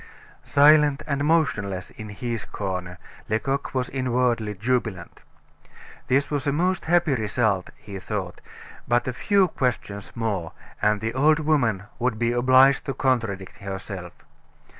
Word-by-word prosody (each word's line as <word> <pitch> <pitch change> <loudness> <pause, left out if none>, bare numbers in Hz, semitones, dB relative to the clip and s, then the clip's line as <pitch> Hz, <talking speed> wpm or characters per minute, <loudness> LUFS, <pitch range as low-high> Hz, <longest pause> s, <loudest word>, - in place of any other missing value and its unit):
Silent 150 0 +5
and 140 -1 -1
motionless 105 - 0
in 110 -1 -9
his 115 +2 -4
corner, 90 -5 -5 0.3
Lecoq 135 +6 -1
was 125 -1 0
inwardly 125 -4 0
jubilant. 115 -4 -2 0.9
This 140 +3 +1
was 145 0 -1
a - - +3
most 180 +5 0
happy 170 -3 +3
result, 110 -4 0
he 100 -2 -9
thought, 95 -3 -5 0.5
but 120 +1 +1
a 130 - -1
few 195 +8 +2
questions 120 - -3
more, 100 -8 -2 0.3
and 105 -1 +2
the 115 +1 -2
old 150 +4 +4
woman 140 -11 +1 0.2
would 125 -2 0
be 120 +1 +1
obliged 130 +3 +5
to 135 - -2
contradict 110 -8 -1
herself. 95 -2 -7
120 Hz, 135 wpm, -24 LUFS, 105-140 Hz, 0.9 s, Silent